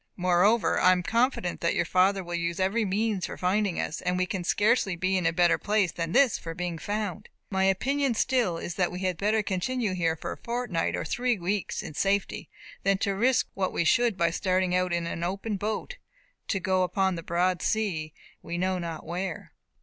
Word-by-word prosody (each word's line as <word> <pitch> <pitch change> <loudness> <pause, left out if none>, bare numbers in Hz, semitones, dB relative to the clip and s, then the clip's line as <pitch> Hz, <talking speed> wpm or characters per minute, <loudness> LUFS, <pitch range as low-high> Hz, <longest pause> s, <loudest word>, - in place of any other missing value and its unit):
Moreover, 185 +3 +3
I 185 - +6
am 180 -1 -1
confident 230 -4 0
that 170 - +1
your - - +1
father 190 +2 +2
will 175 0 -7
use 170 +1 -2
every 195 +5 +1
means 200 -1 0
for - - -7
finding 190 0 0
us; 155 - -3
and 180 0 0
we 185 - +1
can 185 -1 -4
scarcely 205 0 +2
be 185 +2 0
in 180 -3 +1
a - - +3
better 175 +1 +3
place 205 -4 +1
than 165 -1 -3
this 260 0 +4
for 165 0 -7
being 175 -2 -3
found. 205 +2 -4 0.2
My 190 0 +2
opinion 265 +7 +1
still 225 -9 +1
is 170 - -5
that 180 -2 +1
we 180 +1 -6
had 185 -1 0
better 215 +1 +2
continue 205 +3 -1
here 165 -3 0
for - - -6
a - - -6
fortnight 235 -8 -2
or - - -3
three 245 -2 0
weeks 190 +1 -2
in - - -7
safety, 195 +5 -1 0.3
than 195 0 +2
to 200 0 0
risk 245 +6 +2
what 190 -1 -1
we - - +1
should, 230 +5 +3
by 170 -2 +2
starting 185 +1 0
in 180 -2 +1
an 170 0 -4
open 195 +4 -2
boat, 220 - -3 0.5
to 195 - 0
go 185 0 +1
upon 190 +1 +1
the 170 - -5
broad 175 +2 0
sea, 185 -9 -1 0.3
we 170 +1 -5
know 185 +1 0
not 165 -3 -5
where." 175 +1 -5
185 Hz, 205 wpm, -27 LUFS, 175-210 Hz, 0.5 s, I